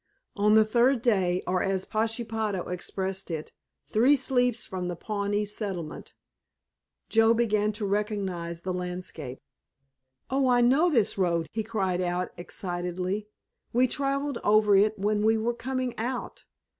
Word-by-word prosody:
On 210 +1 +4
the 220 0 +6
third 240 +2 +3
day, 185 -6 +2
or 185 0 0
as 190 -1 -1
Pashepaho 220 -3 -2
expressed 190 +2 -3
it, 160 -2 -5 0.3
"three 250 +7 +4
sleeps 250 -3 +1
from 185 -1 -4
the 175 - -3
Pawnee 205 +2 -2
settlement," 195 -6 -5 0.9
Joe 225 +1 +4
began 215 -2 +2
to 210 0 -3
recognize 195 -5 -2
the 185 - -2
landscape. 180 -7 -5 0.9
"Oh, 265 0 +1
I 245 -1 +4
know 270 +9 +4
this 230 -9 +1
road," 170 -3 +1
he 220 - -2
cried 190 -5 -1
out 180 0 -1
excitedly, 180 +3 -4 0.5
"we 250 +2 +4
traveled 275 0 -1
over 210 -1 +5
it 210 +2 +4
when 210 +1 0
we 220 +1 +4
were 230 +2 0
coming 255 0 -3
out! 245 +2 -4
210 Hz, 140 wpm, -27 LUFS, 185-235 Hz, 0.9 s, the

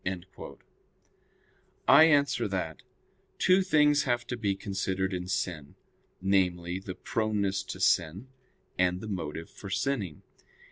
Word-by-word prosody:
I 145 +4 +9
answer 145 -7 +3
that, 90 -5 -4 0.6
Two 185 +1 +4
things 150 -5 +4
have 120 -2 0
to 125 - -4
be 105 -5 -1
considered 95 -1 -2
in 90 0 -4
sin, 90 -6 -3 0.4
namely, 90 -2 0
the 95 -2 -7
proneness 105 -3 -1
to 95 - -7
sin, 90 +4 +1 0.5
and 90 0 +2
the 110 - -7
motive 80 -5 -5
for 100 - -10
sinning. 105 - -2
95 Hz, 120 wpm, -29 LUFS, 90-120 Hz, 0.6 s, I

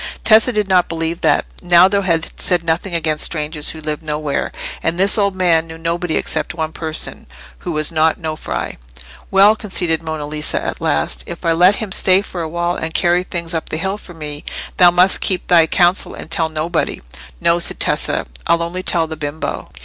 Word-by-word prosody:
Tessa 225 +3 +5
did 210 -3 0
not 185 -2 +2
believe 165 0 -3
that. - - +2 0.2
Naldo 180 +3 +4
had 170 -3 0
said 175 -2 +2
nothing 170 +2 -1
against 155 -2 0
strangers 150 -1 -1
who 160 - -4
lived 150 0 -3
nowhere; 150 -2 -3 0.3
and 165 - -1
this 195 +2 +5
old 200 -3 +1
man 170 -3 +2
knew 160 0 -9
nobody 165 0 -2
except - - -2
one 160 -1 -3
person, 160 -1 -4 0.3
who - - -5
was 155 +1 0
not 160 +1 +1
Nofri. 155 -2 -4 0.5
"Well," 200 +2 +5
conceded 180 -7 -1
Monna 155 -2 -5
Lisa, 150 +1 -2
at - - -5
last, 75 0 0
"if 170 +1 -8
I 165 - +3
let 180 +4 +5
him 210 -2 -5
stay 190 +1 +4
for 180 -3 -6
a 160 - -4
while 175 +1 -1
and 160 0 -5
carry 175 0 +3
things 170 -2 -5
up 160 - -2
the - - -2
hill 190 +4 -3
for 175 - -13
me, 150 -2 -6 0.3
thou 180 -1 +7
must 180 +2 +4
keep 185 -2 0
thy 165 -2 +4
counsel 175 +2 +2
and 160 - -10
tell 160 -1 +1
nobody." 160 +2 -2 0.4
"No," 170 +1 +2
said - - 0
Tessa, - - +1 0.2
"I'll 170 0 +2
only 175 +2 -4
tell 170 -3 0
the 160 0 -6
bimbo." 145 +1 -5
170 Hz, 195 wpm, -17 LUFS, 160-180 Hz, 0.5 s, thou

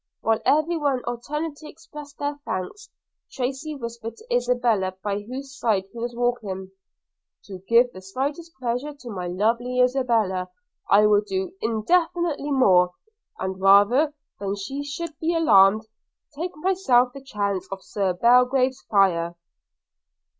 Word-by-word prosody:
While 225 0 +1
every 310 +3 +3
one 280 -5 0
alternately 300 +6 -5
expressed 295 -2 -12
her 290 0 -2
thanks, 395 - -5 0.4
Tracy 270 +4 -3
whispered 235 -3 -7
to 475 +3 -7
Isabella, 235 - +1
by 205 -1 -1
whose 265 +5 -8
side 210 -5 +1
he 235 - -8
was 240 +1 -4
walking: 215 -6 -2 0.7
'To 190 -2 -9
give 240 +1 +4
the 185 - -10
slightest 280 - -4
pleasure 250 +4 -3
to 260 -4 -11
my 180 -3 -4
lovely 230 +7 0
Isabella, 230 -8 +1 0.4
I 210 +1 +6
would 210 0 +4
do 190 -1 -3
infinitely 305 +6 0
more; 185 -10 +4 0.4
and, 190 0 -4
rather 210 +10 +5 0.2
than 200 0 -2
she 270 +9 -5
should 305 +3 -6
be 335 +1 0
alarmed, 215 -9 +5 0.5
take 340 +2 -5
myself 300 -9 +2
the 275 - -9
chance 200 -7 -3
of 195 -1 -6
Sir 195 -3 -1
John 175 - -18
Belgrave's 250 +2 +4
fire.' 175 -4 +2
245 Hz, 140 wpm, -24 LUFS, 200-285 Hz, 0.7 s, I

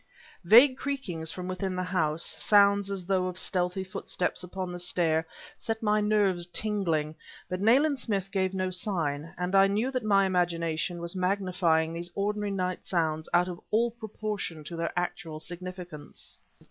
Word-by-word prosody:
Vague 245 +9 +7
creakings 190 - -3
from 180 +1 -6
within 185 0 -3
the 185 - -1
house, 165 -3 0
sounds 200 -1 +5
as 195 -3 -3
though 185 -1 +1
of 180 0 -5
stealthy 180 0 -1
footsteps 185 -1 -3
upon 185 0 -5
the 175 - -6
stair, 165 -2 +1 0.3
set 225 0 -3
my 210 0 +3
nerves 200 -4 +2
tingling; 175 -6 -1 0.3
but 185 +1 -4
Nayland 270 +6 +4
Smith 195 -5 -2
gave 190 -1 0
no 185 -1 -1
sign, 165 -5 -2
and 180 +2 -2
I 195 0 +6
knew 215 +6 0
that 255 -3 -2
my 200 -2 +4
imagination 170 -2 0
was 170 +2 -2
magnifying 180 -4 +1
these 170 +1 -5
ordinary 205 +1 -1
night 185 -2 -2
sounds 160 -3 -1
out 175 +1 +3
of 175 -1 -6
all 235 +2 +2
proportion 215 -7 -5
to 170 +3 -7
their 165 0 -2
actual 165 -3 -3
significance. 175 -2 -9
185 Hz, 160 wpm, -28 LUFS, 170-200 Hz, 0.3 s, Vague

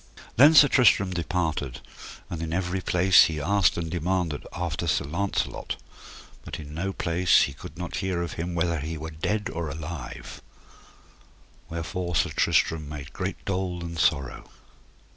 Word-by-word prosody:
Then 145 +6 +7
Sir 145 - +9
Tristram 100 -8 +4
departed, 80 -6 -2 0.5
and 85 -2 -5
in 80 -1 -3
every 95 +1 -1
place 95 +1 +5
he 80 -1 -3
asked 100 +5 +2
and 85 -1 -2
demanded 90 -3 -1
after 85 -1 -3
Sir 80 - +1
Launcelot, 90 +7 -2 0.7
but - - -7
in 75 -1 -9
no 90 +5 -2
place 90 -1 +3
he 70 - -2
could 90 +6 -11
not 90 0 -5
hear 95 -3 -1
of 85 - -5
him 85 +1 -4
whether 85 -1 0
he 80 +3 -4
were 80 +1 -6
dead 105 +7 -2
or 85 -2 -3
alive; 80 -2 -7 1.3
wherefore 85 +1 -4
Sir - - +2
Tristram 75 -3 +1
made 75 -1 -8
great 95 0 -4
dole 90 -2 -2
and 85 -1 -6
sorrow. 70 -3 0
85 Hz, 155 wpm, -26 LUFS, 80-95 Hz, 1.3 s, Sir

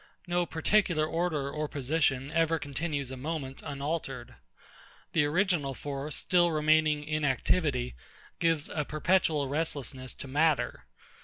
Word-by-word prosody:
No 175 -1 0
particular 165 -1 +2
order 155 -4 -1
or 150 +1 -2
position 140 -1 0
ever 165 0 +2
continues 145 -2 -3
a 130 - -6
moment 135 -1 -4
unaltered. 140 -3 -4 0.8
The 155 -3 +4
original 155 -4 +1
force, 140 +1 -4
still 175 -2 +3
remaining 155 -1 +3
in 155 0 -2
activity, 130 -1 +1 0.5
gives 165 -3 +2
a 150 - -2
perpetual 155 -1 +1
restlessness 140 -3 -3
to - - -8
matter. 140 - +1
150 Hz, 125 wpm, -30 LUFS, 140-165 Hz, 0.8 s, The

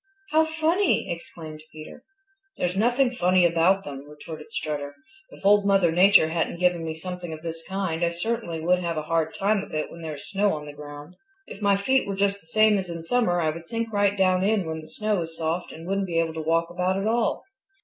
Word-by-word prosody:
"How 315 +1 +4
funny!" 320 - +1
exclaimed 160 -2 -8
Peter. 155 +10 -11 0.5
"There's 180 +1 -1
nothing 245 +5 +2
funny 185 -6 +3
about 170 +3 +3
them," 140 0 -8
retorted 155 +2 -10
Strutter. 145 -6 -4 0.3
"If - - -14
Old 205 0 +6
Mother 195 -4 +4
Nature 180 -1 +6
hadn't 165 +1 -1
given 180 -2 +2
me 160 -1 -4
something 180 +1 -6
of 160 0 -8
this 165 -1 -5
kind 190 -4 -2
I 170 - +3
certainly 170 -1 -3
would 180 +2 +2
have 170 -2 -2
a 155 - -2
hard 165 0 -1
time 205 +2 +1
of 195 - -8
it 155 - -2
when 170 - -10
there 160 -2 -5
is 140 - -10
snow 200 0 +1
on 150 -1 -7
the 145 - -9
ground. 145 +3 -10 0.3
If 200 - -11
my 200 -1 +4
feet 260 +6 +1
were 200 - -2
just 200 0 0
the - - -19
same 215 +3 +4
as 185 -2 -5
in 165 -1 -6
summer 180 -2 +1
I 155 -1 +1
would 165 +1 -9
sink 230 +1 -3
right 205 0 +2
down 185 -1 +3
in 205 -2 +2
when 160 0 -4
the 155 - -13
snow 210 +3 -1
is 165 0 -7
soft 165 +2 -2
and 165 +1 -10
wouldn't 195 +1 -1
be 170 -2 -2
able 165 -1 +1
to 160 - -4
walk 165 +2 +1
about 180 +2 0
at 195 - -2
all. 230 +1 +1
175 Hz, 230 wpm, -25 LUFS, 160-200 Hz, 0.5 s, Old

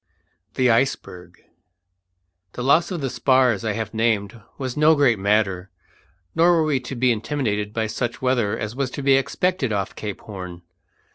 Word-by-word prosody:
THE 125 -2 +3
ICEBERG. 90 -7 -2 1.1
The 125 - -5
loss 140 +6 +3
of 180 -5 -4
the 135 - -1
spars 130 -6 +2
I 110 -2 -1
have 110 0 -4
named 110 -1 0 0.2
was 130 -2 -4
no 155 +1 +5
great 130 -7 +3
matter, 100 -2 +1 0.6
nor 170 +2 +4
were 165 -2 +3
we 145 -4 +1
to 130 +1 -7
be 125 +1 +2
intimidated 110 -3 -2
by 110 0 -1
such 120 +2 -3
weather 125 -5 0
as 110 +2 -5
was 135 -1 -1
to 140 - -4
be 135 0 +4
expected 140 +1 0
off 100 -2 -2
Cape 105 -2 -6
Horn. 90 -4 -9
120 Hz, 165 wpm, -22 LUFS, 105-135 Hz, 1.1 s, no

